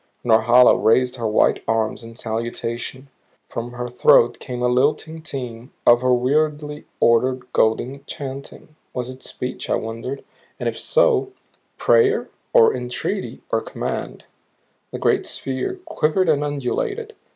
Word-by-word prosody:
Norhala 120 Hz, +2 st, +6 dB
raised 125 Hz, +3 st, +3 dB
her 115 Hz, -2 st, -1 dB
white 105 Hz, -, +2 dB
arms 110 Hz, +1 st, 0 dB
in 115 Hz, 0 st, -11 dB
salutation; 115 Hz, +3 st, -4 dB, 0.4 s
from 120 Hz, +1 st, -6 dB
her 125 Hz, 0 st, -4 dB
throat 120 Hz, -1 st, +4 dB
came 125 Hz, -2 st, -5 dB
a -, -, +3 dB
lilting 150 Hz, +6 st, +1 dB
theme 125 Hz, -5 st, -7 dB
of 120 Hz, 0 st, +6 dB
her 130 Hz, 0 st, +2 dB
weirdly 150 Hz, +4 st, 0 dB
ordered, 125 Hz, +2 st, +3 dB
golden 125 Hz, +5 st, +1 dB
chanting. 140 Hz, +2 st, -8 dB, 0.2 s
Was 125 Hz, 0 st, -3 dB
it 130 Hz, 0 st, -12 dB
speech, 125 Hz, 0 st, -5 dB
I -, -, +3 dB
wondered; 115 Hz, +5 st, -5 dB, 0.4 s
and -, -, -2 dB
if -, -, -2 dB
so 440 Hz, -5 st, +2 dB, 0.4 s
prayer 445 Hz, -2 st, +3 dB, 0.2 s
or 460 Hz, -2 st, +6 dB
entreaty 125 Hz, 0 st, -4 dB
or -, -, +2 dB
command? -, -, -5 dB, 0.7 s
The -, -, -6 dB
great -, -, +1 dB
sphere 135 Hz, -, -3 dB
quivered 165 Hz, +4 st, +1 dB
and 145 Hz, -2 st, +2 dB
undulated. 150 Hz, -, -3 dB
130 Hz, 135 wpm, -21 LUFS, 120-150 Hz, 0.7 s, Norhala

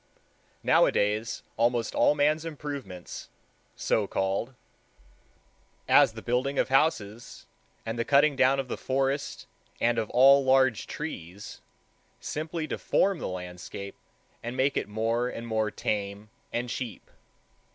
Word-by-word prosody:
Nowadays 105 Hz, +3 st, +2 dB
almost 115 Hz, 0 st, +1 dB
all 150 Hz, -, +4 dB
man's 150 Hz, +2 st, +2 dB
improvements, 140 Hz, -, -7 dB, 0.5 s
so 105 Hz, -2 st, 0 dB
called, 95 Hz, +8 st, -1 dB, 1.3 s
as -, -, +6 dB
the -, -, -9 dB
building 130 Hz, +3 st, 0 dB
of -, -, +1 dB
houses 120 Hz, -6 st, 0 dB, 0.4 s
and 115 Hz, +1 st, -3 dB
the -, -, +2 dB
cutting 145 Hz, +3 st, +4 dB
down 135 Hz, +1 st, +4 dB
of 135 Hz, -, -2 dB
the -, -, -4 dB
forest 135 Hz, +2 st, -1 dB, 0.3 s
and 120 Hz, 0 st, +2 dB
of 110 Hz, -, -3 dB
all 135 Hz, +2 st, +6 dB
large 130 Hz, -3 st, +3 dB
trees, 100 Hz, -, -7 dB, 0.6 s
simply 155 Hz, +1 st, -4 dB
deform 190 Hz, +3 st, +1 dB
the -, -, -3 dB
landscape, 90 Hz, +2 st, -7 dB, 0.5 s
and 120 Hz, +2 st, -5 dB
make 135 Hz, +1 st, +2 dB
it -, -, -2 dB
more 115 Hz, +3 st, 0 dB
and 115 Hz, -, -6 dB
more 110 Hz, -2 st, 0 dB
tame 105 Hz, 0 st, -3 dB, 0.2 s
and 120 Hz, +1 st, -2 dB
cheap. 120 Hz, -7 st, -5 dB
120 Hz, 125 wpm, -28 LUFS, 105-140 Hz, 1.3 s, as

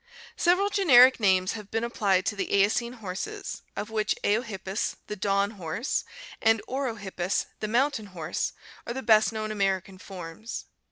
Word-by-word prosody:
— -, -, -18 dB
Several 370 Hz, +4 st, +3 dB
generic 260 Hz, -11 st, +7 dB
names 190 Hz, -2 st, +3 dB
have 210 Hz, -3 st, -7 dB
been 225 Hz, +2 st, -1 dB
applied 200 Hz, -5 st, +1 dB
to 210 Hz, -, 0 dB
the 200 Hz, -, -3 dB
Eocene 215 Hz, +4 st, +2 dB
horses 235 Hz, -, -6 dB
of 215 Hz, -, -5 dB
which 215 Hz, -1 st, 0 dB
Eohippus, 205 Hz, -3 st, -1 dB
the 210 Hz, -, -5 dB
dawn 200 Hz, 0 st, +1 dB
horse, 195 Hz, -, -3 dB, 0.4 s
and 225 Hz, 0 st, +4 dB
Orohippus, 210 Hz, -9 st, -2 dB
the 215 Hz, -, -2 dB
mountain 240 Hz, -1 st, +1 dB
horse, 170 Hz, -3 st, -3 dB, 0.3 s
are 235 Hz, -, -2 dB
the 265 Hz, -, -4 dB
best 220 Hz, -1 st, +5 dB
known 215 Hz, -1 st, -3 dB
American 195 Hz, -2 st, -1 dB
forms. 185 Hz, +3 st, -7 dB
215 Hz, 155 wpm, -27 LUFS, 195-235 Hz, 0.4 s, generic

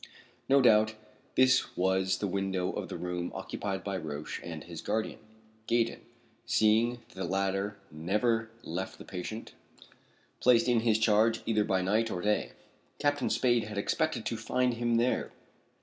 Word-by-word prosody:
No 140 Hz, +1 st, +6 dB
doubt 110 Hz, -2 st, +5 dB, 0.4 s
this 130 Hz, 0 st, +3 dB
was 95 Hz, +1 st, +2 dB
the -, -, -2 dB
window 95 Hz, -1 st, -1 dB
of -, -, -5 dB
the -, -, -5 dB
room 90 Hz, -1 st, -3 dB
occupied 95 Hz, -2 st, -4 dB
by 100 Hz, -1 st, -2 dB
Roch 75 Hz, -3 st, -5 dB
and -, -, -6 dB
his -, -, -8 dB
guardian, 110 Hz, 0 st, -2 dB, 0.5 s
Gaydon, 115 Hz, 0 st, +1 dB, 0.4 s
seeing 110 Hz, +2 st, +3 dB, 0.2 s
that -, -, -18 dB
the 95 Hz, -, -5 dB
latter 95 Hz, +1 st, -1 dB
never 110 Hz, +8 st, 0 dB
left 95 Hz, 0 st, -4 dB
the -, -, -11 dB
patient 100 Hz, +5 st, -6 dB, 0.9 s
placed 120 Hz, -1 st, +4 dB
in 120 Hz, -2 st, +4 dB
his 110 Hz, -1 st, +3 dB
charge 110 Hz, +1 st, +3 dB
either 110 Hz, -2 st, +2 dB
by 95 Hz, -2 st, +1 dB
night 110 Hz, +4 st, +1 dB
or 90 Hz, -, -3 dB
day. 105 Hz, +3 st, 0 dB, 0.4 s
Captain 145 Hz, -3 st, +1 dB
Spade 120 Hz, -3 st, +2 dB
had 105 Hz, -1 st, -7 dB
expected 100 Hz, -, 0 dB
to -, -, -2 dB
find 125 Hz, -1 st, +1 dB
him 120 Hz, 0 st, 0 dB
there. 120 Hz, +2 st, +1 dB
105 Hz, 155 wpm, -30 LUFS, 95-115 Hz, 0.9 s, No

